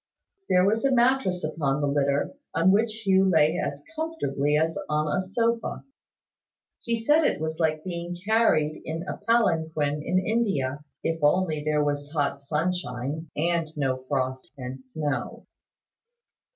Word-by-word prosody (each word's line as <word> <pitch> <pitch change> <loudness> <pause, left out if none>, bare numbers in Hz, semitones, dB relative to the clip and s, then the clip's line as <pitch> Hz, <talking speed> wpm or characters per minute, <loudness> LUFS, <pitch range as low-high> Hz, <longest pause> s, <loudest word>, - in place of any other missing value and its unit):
There 180 0 +5
was 220 +3 +2
a 275 - +3
mattress 240 -7 +2
upon 150 -2 -1
the 145 - +1
litter, 140 - +1 0.2
on 165 +3 +4
which 220 +2 +1
Hugh 190 0 +4
lay 160 0 +3
as - - -4
comfortably 150 - 0
as 160 +1 +1
on 150 0 +1
a - - +1
sofa. 230 +4 -1 1.0
He 230 -1 -2
said 295 +8 +4
it 290 - +1
was 160 +1 -3
like 155 -1 +1
being 175 -1 -5
carried 205 -9 +2
in 165 +1 -4
a - - -5
palanquin 160 -10 +1
in 180 +4 0
India, 185 - 0 0.2
if 165 -1 -1
only 155 -1 +2
there 150 0 +1
was 145 0 -2
hot 140 -2 0
sunshine, 155 -1 -2
and 165 0 0
no 130 -2 -1
frost 130 -2 -2
and 130 0 -7
snow. 145 +2 -4
160 Hz, 145 wpm, -26 LUFS, 145-190 Hz, 1.0 s, There